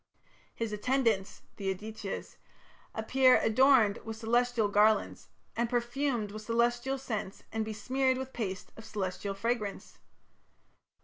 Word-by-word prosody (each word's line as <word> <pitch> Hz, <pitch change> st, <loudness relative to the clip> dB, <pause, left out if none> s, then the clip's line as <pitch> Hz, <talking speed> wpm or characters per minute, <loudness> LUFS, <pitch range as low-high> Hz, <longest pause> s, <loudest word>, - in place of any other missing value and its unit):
His 225 Hz, -2 st, -3 dB
attendants, 220 Hz, -3 st, 0 dB
the 195 Hz, -2 st, -1 dB
Adityas, 210 Hz, +1 st, -6 dB, 0.6 s
appear 255 Hz, +3 st, +5 dB
"adorned 225 Hz, -2 st, +4 dB
with 225 Hz, -1 st, -6 dB
celestial 235 Hz, 0 st, +2 dB
garlands 210 Hz, +1 st, +2 dB, 0.3 s
and 235 Hz, 0 st, 0 dB
perfumed 240 Hz, -2 st, -1 dB
with 215 Hz, +1 st, -7 dB
celestial 240 Hz, +4 st, +1 dB
scents 215 Hz, -7 st, -5 dB
and 220 Hz, 0 st, -1 dB
besmeared 255 Hz, +5 st, 0 dB
with 265 Hz, 0 st, -6 dB
paste 190 Hz, -5 st, -4 dB
of 225 Hz, -, -11 dB
celestial 195 Hz, -1 st, -3 dB
fragrance". 215 Hz, -1 st, -3 dB
225 Hz, 115 wpm, -31 LUFS, 210-245 Hz, 0.6 s, appear